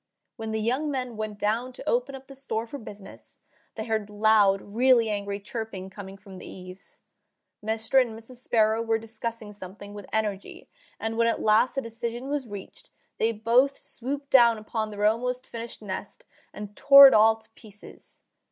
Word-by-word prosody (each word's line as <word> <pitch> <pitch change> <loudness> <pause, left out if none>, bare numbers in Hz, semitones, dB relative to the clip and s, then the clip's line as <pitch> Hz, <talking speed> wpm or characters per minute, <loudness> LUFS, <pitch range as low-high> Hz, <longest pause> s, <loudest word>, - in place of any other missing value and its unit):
When 220 0 -5
the 220 - -1
young 255 +8 0
men 255 -4 -3
went 215 -1 -5
down 230 +5 -1
to - - -11
open 250 +3 0
up 270 0 -11
the 275 - -12
store 230 -5 -4
for 280 +5 -8
business, 205 -3 -12 0.4
they 220 - -5
heard 220 -2 -2
loud, 210 -2 +4
really 235 +2 +2
angry, 200 -1 -3
chirping 205 -3 -6
coming 195 -1 -9
from 195 -2 -12
the - - -10
eaves. 185 0 -12 0.6
Mr. 225 +4 +2
and 230 -3 -3
Mrs. 230 +3 -10
Sparrow 220 -2 +2
were 225 -1 +1
discussing 225 -1 -6
something 200 +1 -10
with 205 -2 -9
energy, 210 -3 -3 0.3
and 225 0 -3
when 230 0 +3
at 230 - 0
last 220 +5 +3
a - - +2
decision 235 +2 -5
was 285 -3 -2
reached 205 -2 -10 0.3
they 225 - +2
both 240 +5 +2
swooped 280 +3 -6
down 235 -3 +6
upon 215 0 -4
their 205 0 -2
almost 250 +4 0
finished 230 -1 -8
nest 190 -2 -7 0.3
and 210 0 -9
tore 280 0 +10
it 265 - +4
all 220 +1 +6
to 220 0 -18
pieces. 210 -2 -14
225 Hz, 180 wpm, -26 LUFS, 210-240 Hz, 0.6 s, tore